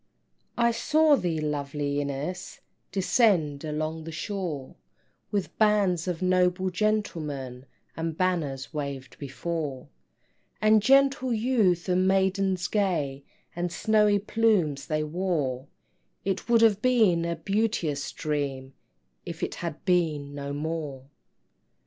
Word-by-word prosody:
I 235 0 +4
saw 300 +6 +4
thee, 170 - -1
lovely 145 -1 -2
Ines, 145 +7 -5 0.3
Descend 185 - +2
along 155 +1 -3
the 165 - -6
shore, 165 -6 -4 0.6
With 200 -3 -2
bands 200 -5 +3
of 180 0 -2
noble 185 0 +2
gentlemen, 155 -11 -2 0.3
And 165 -1 -3
banners 160 -7 -1
waved 140 -3 -5
before; 140 0 -4 0.7
And 215 0 +5
gentle 275 +2 +4
youth 215 -7 +2
and 185 0 +2
maidens 190 -1 +1
gay, 150 -10 -1 0.3
And 175 0 -2
snowy 210 +2 +3
plumes 200 - +1
they 155 -1 0
wore; 150 -6 -2 0.6
It 195 +3 -2
would 230 -1 +5
have 210 -2 +4
been 220 -9 +3
a 170 0 -1
beauteous 170 -5 -1
dream, 140 -3 -3 0.5
If - - -7
it - - -2
had - - -5
been 155 -6 +1
no 140 0 -5
more! 145 -3 -4
175 Hz, 115 wpm, -27 LUFS, 145-200 Hz, 0.7 s, And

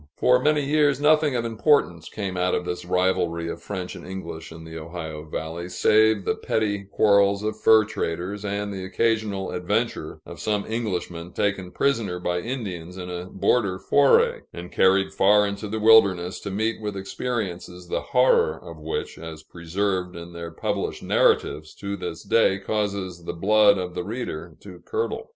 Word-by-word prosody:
For 125 0 +4
many 150 0 +2
years, 145 -1 +3
nothing 150 -1 +3
of 120 -1 -1
importance 110 - +1
came 100 -3 -4
out 90 0 +1
of - - -2
this 90 0 -4
rivalry 90 -2 0
of 85 - -5
French 90 -1 -5
and - - -10
English 85 -4 -7
in 80 - -10
the 80 0 -10
Ohio 80 -1 -6
Valley, 80 +3 -5
save 110 +1 +3
the - - +2
petty 100 -2 -1
quarrels 100 0 +3
of 110 0 -1
fur 110 -1 +6
traders, 95 +1 -4
and 100 0 -3
the 95 -1 -5
occasional 105 0 0
adventure 90 -1 -2
of - - -10
some 105 -1 -1
Englishman 90 -6 -4
taken 95 -3 -1
prisoner 115 -6 0
by 90 0 -1
Indians 95 -7 -5
in 90 -1 -6
a 90 0 -5
border 95 0 +1
foray, 140 +8 +4
and 85 +1 -9
carried 95 +1 +3
far 105 +1 +5
into 100 +1 -4
the 110 +2 -3
wilderness 100 -5 +5
to 100 - -6
meet 110 +3 -1
with 105 -2 -4
experiences 95 -4 -4
the - - -2
horror 125 - +3
of 85 -2 -11
which, 80 +1 -4
as 80 -1 -8
preserved 90 +2 -2
in 85 0 -9
their 85 -1 -6
published 80 - -3
narratives, 75 0 +1
to 100 0 -4
this 90 -4 -6
day 110 -4 +3
causes 100 -4 -3
the - - -3
blood 100 +3 +4
of 90 -1 -4
the 90 - -3
reader 90 -7 -5
to 90 -3 -11
curdle. - - -3
95 Hz, 170 wpm, -24 LUFS, 90-110 Hz, -, fur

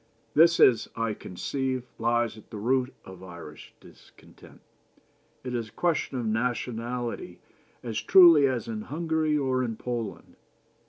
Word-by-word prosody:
This, 170 +2 +5
as 115 -4 +5
I 115 -1 -1
conceive, 130 +7 -4 0.2
lies 120 0 +1
at 110 - -16
the 110 - -8
root 125 +4 0
of 95 -1 -12
Irish 85 -4 -11
discontent. - - -18 0.8
It 125 -1 -5
is 115 -3 -3
a - - -25
question 165 -6 -1
of 120 - -3
nationality 120 +1 -3 0.5
as 110 -2 -3
truly 165 +2 +7
as 125 -4 -2
in 110 -2 -4
Hungary 155 +3 -1
or 130 -2 0
in 115 -2 -3
Poland. 120 -1 -6
120 Hz, 140 wpm, -27 LUFS, 110-135 Hz, 0.8 s, truly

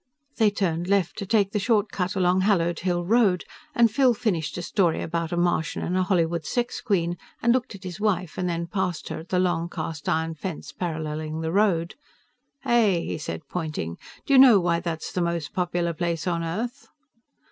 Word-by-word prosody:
They 220 -3 +5
turned 175 -4 -1
left, 195 -3 +1
to 200 - -5
take 200 -2 +2
the 210 - 0
short 210 0 +1
cut 180 0 -2
along 185 0 +3
Hallowed 175 -4 +2
Hill 175 -1 -1
Road, 205 -3 +3 0.3
and 235 -4 +5
Phil 250 +1 +4
finished 190 -11 -1
a 175 - -4
story 175 -3 +1
about 165 0 -2
a 175 - -1
Martian 175 -2 0
and 180 - -1
a 185 - +2
Hollywood 170 -3 +1
sex 245 +6 -2
queen 175 -7 0 0.2
and 235 +1 +3
looked 250 -4 -1
at 195 - -12
his 180 -1 -6
wife 185 -6 0
and 180 -1 -1
then 170 0 -2
past 180 -1 -2
her - - -4
at 165 - -12
the 185 - +1
long, 175 -2 +1
cast 160 -2 -4
iron 160 0 0
fence 160 -3 -6
paralleling 155 -1 -4
the 160 0 -2
road. 180 -4 +2 0.7
"Hey," 210 -8 +2
he - - -4
said, 150 0 -6
pointing, 155 - -4 0.3
"do 275 - +1
you 265 - +8
know 250 -6 +8
why 170 -1 +1
that's 165 -2 -4
the 180 - -1
most 170 -3 -2
popular 175 -1 -1
place 165 -1 -2
on 170 -2 0
earth?" 230 +11 -4
175 Hz, 200 wpm, -25 LUFS, 165-200 Hz, 0.7 s, you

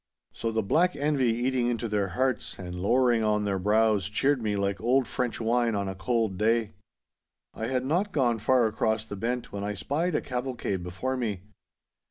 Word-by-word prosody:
So 115 - -3
the 110 0 0
black 175 - +2
envy 145 -3 +1
eating 120 +1 0
into 120 -1 -1
their 105 -2 0
hearts 130 -2 -1
and 90 -2 -7
lowering 120 +3 +3
on 105 -1 +1
their 100 -1 0
brows 105 0 +2
cheered 135 +5 +1
me 105 -2 -1
like 100 0 -1
old 125 +2 +2
French 125 -3 -2
wine 115 0 +1
on 100 -1 -1
a 95 - -3
cold 105 0 -1
day. 115 0 +2 0.8
I 110 - -4
had 130 0 -1
not 180 +8 0
gone 120 -8 +1
far 125 +2 +3
across 110 0 0
the 105 - -6
bent 120 +4 -3
when 100 0 -4
I 105 0 -2
spied 155 - -1
a - - +1
cavalcade 125 -7 -3
before 95 +10 -3
me. 105 -7 -3
115 Hz, 190 wpm, -27 LUFS, 105-130 Hz, 0.8 s, lowering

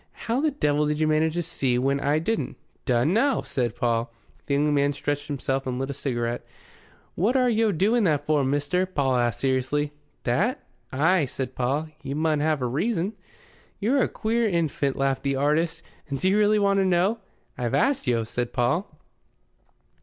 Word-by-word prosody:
"How 235 +4 0
the 310 - +3
devil 150 - +1
did 150 0 -1
you 155 - +2
manage 155 +1 +2
to 175 - 0
see 135 -6 -1
that 125 - +1
when 140 +1 +1
I 145 +2 +1
didn't?" 220 +8 -2 0.3
"Dun 125 +6 +2
no!" 275 +6 +2
said 120 -4 -2
Paul. 115 0 0 0.4
The 140 - +1
young 150 +1 +2
man 140 0 +2
stretched 145 0 -3
himself 135 -2 -2
and 125 -1 -2
lit 135 +2 -2
a - - -4
cigarette. 120 -3 -2 0.7
"What 220 +10 +1
are 255 -1 +3
yo' 225 -2 +2
doing 210 +7 +2
that 145 -4 +1
for, 150 -2 +2
mister?" 145 +7 0
Paul 135 -8 0
asked 120 -3 0
seriously. 135 +2 0 0.3
"That?" 185 - 0 0.3
"Ay," 160 +3 +2
said 130 0 -5
Paul. 140 +6 -1
"You 140 0 -4
mun 155 -1 +1
have 150 -2 +1
a - - +1
reason." 175 - -1 0.7
"You're 250 +7 +2
a - - +2
queer 230 +1 0
infant," 155 -6 0
laughed 135 -1 0
the 140 -1 0
artist. 155 +4 0 0.3
"Do 140 +7 0
you 190 - +3
really 210 0 +4
want 200 -1 +3
to 195 - +2
know?" 185 +5 +2 0.4
"I've 120 -2 -1
asked 275 - +1
yo'," 115 -2 +2
said 120 +2 -4
Paul. 140 +11 0
150 Hz, 185 wpm, -25 LUFS, 135-185 Hz, 0.7 s, really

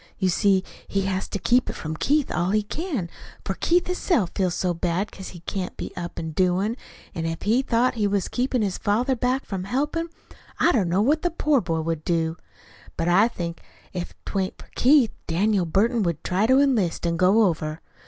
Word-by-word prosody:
You 190 -2 +1
see, 190 +1 +3 0.2
he 195 - 0
has 190 0 -2
to - - -3
keep 245 +6 +2
it - - -3
from 155 0 -5
Keith 290 - +1
all 175 +1 0
he 215 +1 +2
can, 280 - -3 0.4
for 195 - -1
Keith 345 - +2
hisself 350 - 0
feels 185 -2 0
so 180 -2 0
bad 175 +4 -1
'cause 190 - -9
he 175 - -11
can't 185 +1 -4
be - - -6
up 175 -1 -6
an' 160 -1 -4
doin'; 185 +6 +1 0.4
an' 165 0 -3
if 165 0 -4
he 230 +5 +3
thought 250 -1 +2
he 215 -4 0
was 200 -2 0
keepin' 250 -2 0
his 195 -3 -2
father 240 +6 +1
back 255 +3 0
from 190 -2 -4
helpin', 295 - -1 0.5
I - - +5
don't 200 - +1
know 190 +4 +2
what 300 +6 +2
the 350 - +1
poor 300 -5 +2
boy 165 -4 -1
would 160 -1 -3
do. 165 -1 0 0.6
But 165 - 0
I 195 +6 +5
think 170 -8 -5 0.3
if 180 -2 -5
'twa'n't 190 -1 -2
for - - -14
Keith, 260 -3 +4 0.2
Daniel 185 +2 +1
Burton 225 +8 +2
would 170 -5 -1
try 195 +4 +1
to 260 +2 +5
enlist 230 -13 +1
an' 170 0 +1
go 190 +6 +4
over. 160 -4 -1
195 Hz, 205 wpm, -24 LUFS, 175-245 Hz, 0.6 s, I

